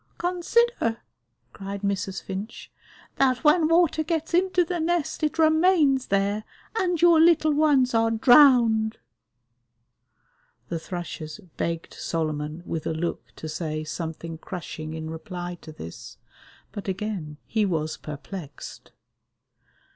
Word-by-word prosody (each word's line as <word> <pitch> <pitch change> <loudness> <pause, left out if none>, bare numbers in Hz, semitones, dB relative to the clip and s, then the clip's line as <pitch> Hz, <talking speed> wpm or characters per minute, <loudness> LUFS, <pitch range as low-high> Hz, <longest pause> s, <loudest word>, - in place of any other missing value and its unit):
"Consider," 360 - +1 0.6
cried 200 0 -6
Mrs. 195 -1 -2
Finch, 200 +4 -7 0.5
"that 255 -2 +2
when 310 +1 +5
water 330 -1 +3
gets 320 +1 -2
into 365 0 +3
the 350 +1 -3
nest 335 -1 -1
it 305 0 0
remains 315 -4 +4
there 200 +2 +1 0.3
and 360 -6 0
your 340 -1 +6
little 320 -2 +5
ones 285 -4 +3
are 225 0 +3
drowned." 230 -2 +5 1.7
The 170 - -2
thrushes 160 -3 -6 0.2
begged 165 -1 -3
Solomon 155 0 -3
with 160 -2 -4
a - - -1
look 170 +2 -3
to 160 - -7
say 155 0 -3
something 160 +1 -6
crushing 160 -3 -6
in 160 0 -5
reply 175 0 -6
to 155 - -10
this, 85 - -10 0.5
but 205 - -7
again 190 -6 -4
he 220 -1 0
was 160 -5 -1
perplexed. 150 +1 -9
215 Hz, 120 wpm, -25 LUFS, -, 1.7 s, your